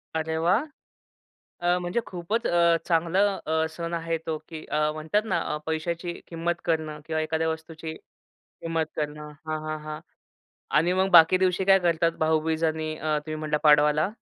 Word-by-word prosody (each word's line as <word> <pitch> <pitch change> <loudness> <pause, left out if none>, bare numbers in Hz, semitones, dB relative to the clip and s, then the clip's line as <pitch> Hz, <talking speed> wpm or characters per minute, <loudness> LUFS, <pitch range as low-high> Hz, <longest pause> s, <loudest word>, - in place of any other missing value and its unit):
अरे 160 0 -1
वाह! 195 - +3 1.0
अ, 175 +1 +2
म्हणजे 175 +6 -1
खूपच 190 +6 -3
अ, 170 -1 +4
चांगला 170 +3 +2 0.2
अ, 160 +1 +1
सण 170 +1 -5
आहे 165 0 -1
तो, 160 -1 -2
की 160 -2 -8
अ, 150 0 0
म्हणतात 160 +7 0
ना 185 -5 0
अ, - - -1
पैशाची 170 +2 -2
किंमत 170 +1 -2
करणं 155 -2 -1
किंवा 160 -1 -1
एखाद्या 160 +1 -1
वस्तूची 160 0 -6 0.7
किंमत 165 -1 -1
करणं 150 0 -4 0.2
हां, 155 0 -2
हां, 155 0 -4
हां. 155 0 -6 0.8
आणि 175 +4 +3
मग 190 +1 +2
बाकी 170 +1 +8
दिवशी 185 0 +1
काय 195 0 +6
करतात? 170 -1 +2
भाऊबीज 160 +1 +1
आणि 155 -1 -1
अ, 155 -1 0
तुम्ही 155 0 -4
म्हटलं 150 -1 0
पाडवाला? 150 +3 +5
160 Hz, 165 wpm, -26 LUFS, 155-175 Hz, 1.0 s, बाकी